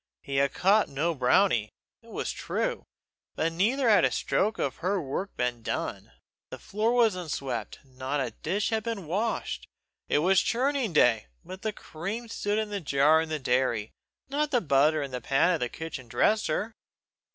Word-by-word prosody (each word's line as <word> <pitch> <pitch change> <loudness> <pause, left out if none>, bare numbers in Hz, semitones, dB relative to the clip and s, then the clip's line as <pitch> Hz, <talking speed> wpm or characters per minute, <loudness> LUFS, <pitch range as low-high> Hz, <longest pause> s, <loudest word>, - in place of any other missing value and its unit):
He 135 -1 -3
had 140 0 +3
caught 200 +3 +3
no 155 +5 0
brownie, 125 - +3 0.3
it - - -18
was - - -3
true, - - -3 0.5
but 165 - 0
neither 235 +10 +2
had 215 -2 +6
a - - +5
stroke 215 +3 0
of 135 - -2
her 195 +3 0
work 170 +6 -4
been 125 -1 -1
done. - - -4 0.4
The - - -7
floor 215 +3 -1
was 235 -4 +4
unswept; 140 -8 -4
not 130 +2 -4
a 135 - -1
dish 200 +8 -2
had 220 -1 +1
been 220 -5 -4
washed; 205 +8 -2 0.4
it - - +3
was 185 +5 +4
churning 260 -1 0
day, 120 - +3 0.2
but 185 +1 -9
the 220 - -1
cream 205 +6 -6
stood 205 -1 -1
in 215 -1 -2
the 200 -1 -3
jar 150 +1 +4
in 160 - -4
the 155 - -1
dairy, 125 -5 0 0.4
not 290 +2 0
the 255 -4 +3
butter 150 -3 +3
in 140 - -6
the 125 -1 -4
pan 135 +9 +3
on 170 - +1
the 125 - -1
kitchen 150 -5 -7
dresser. 215 - +1
170 Hz, 180 wpm, -28 LUFS, 135-215 Hz, 0.5 s, had